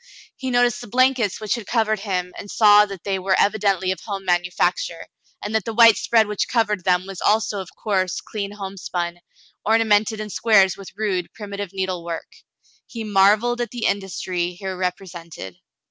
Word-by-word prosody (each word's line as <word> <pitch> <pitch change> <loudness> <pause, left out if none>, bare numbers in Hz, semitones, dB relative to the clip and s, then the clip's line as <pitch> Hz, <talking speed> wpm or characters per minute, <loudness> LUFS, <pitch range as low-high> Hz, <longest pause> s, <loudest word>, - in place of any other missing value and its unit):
He 260 - -5
noticed 245 -1 +2
the - - -9
blankets 250 -2 +2
which 215 -1 -1
had 235 -4 -5
covered 220 -3 +1
him, 180 -3 -3
and 205 - -9
saw 210 -1 +6
that 195 -4 -9
they 195 -1 -1
were 190 0 +1
evidently 200 -3 +2
of 185 - -4
home 195 -1 -6
manufacture, 180 - 0 0.4
and 210 - -4
that 220 - +1
the 225 -1 -5
white 230 -1 +8
spread 225 -2 +3
which 210 -1 -2
covered 210 -5 0
them 180 0 +2
was 195 -1 -8
also 210 -1 +1
of 185 - -10
coarse, 190 -4 -1
clean 205 -2 -5
homespun, 185 -3 -5 0.4
ornamented 220 -1 +2
in 215 -1 -5
squares 195 -5 +4
with 195 0 -12
rude, 195 -5 -2
primitive 200 -2 -6
needlework. 180 -4 -4 0.6
He 230 -2 -6
mar 200 0 +5
velled 240 +2 -2
at 240 - -2
the 240 -2 -4
industry 185 -3 -2
here 190 +1 -6
represented. 170 - -6
200 Hz, 175 wpm, -22 LUFS, 185-220 Hz, 0.6 s, white